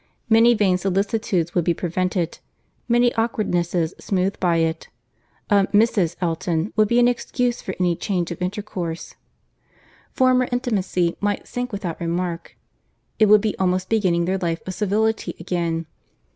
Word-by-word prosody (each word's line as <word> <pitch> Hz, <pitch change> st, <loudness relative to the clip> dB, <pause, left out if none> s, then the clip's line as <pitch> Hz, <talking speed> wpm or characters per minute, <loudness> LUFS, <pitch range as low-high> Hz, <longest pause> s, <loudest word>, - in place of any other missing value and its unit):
Many 230 Hz, +2 st, +6 dB
vain 190 Hz, -4 st, +2 dB
solicitudes 195 Hz, -2 st, 0 dB
would 175 Hz, -, +1 dB
be 170 Hz, +1 st, +1 dB
prevented—many 185 Hz, +7 st, -2 dB
awkwardnesses 175 Hz, -7 st, 0 dB
smoothed 190 Hz, 0 st, -1 dB
by 175 Hz, -2 st, +2 dB
it. 165 Hz, 0 st, -1 dB, 0.6 s
A 200 Hz, -1 st, +4 dB
Mrs. 205 Hz, -5 st, +2 dB
Elton 170 Hz, +1 st, -1 dB
would 215 Hz, -1 st, +4 dB
be 235 Hz, -, +1 dB
an 245 Hz, 0 st, +5 dB
excuse 245 Hz, 0 st, -1 dB
for 190 Hz, -, -5 dB
any 175 Hz, -2 st, +2 dB
change 180 Hz, -2 st, -2 dB
of 170 Hz, -, -7 dB
intercourse; 180 Hz, -3 st, -4 dB, 1.0 s
former 255 Hz, -1 st, +3 dB
intimacy 195 Hz, -8 st, 0 dB
might 205 Hz, 0 st, -1 dB
sink 245 Hz, 0 st, -4 dB
without 185 Hz, -5 st, -5 dB
remark. 170 Hz, 0 st, -3 dB, 0.6 s
It 215 Hz, -, +6 dB
would 210 Hz, 0 st, +6 dB
be 215 Hz, 0 st, -1 dB
almost 185 Hz, 0 st, 0 dB
beginning 185 Hz, -6 st, +2 dB
their 190 Hz, +2 st, -1 dB
life 170 Hz, -2 st, -2 dB
of 185 Hz, -, -4 dB
civility 210 Hz, -2 st, 0 dB
again. 170 Hz, -1 st, -2 dB
185 Hz, 140 wpm, -22 LUFS, 170-215 Hz, 1.0 s, Many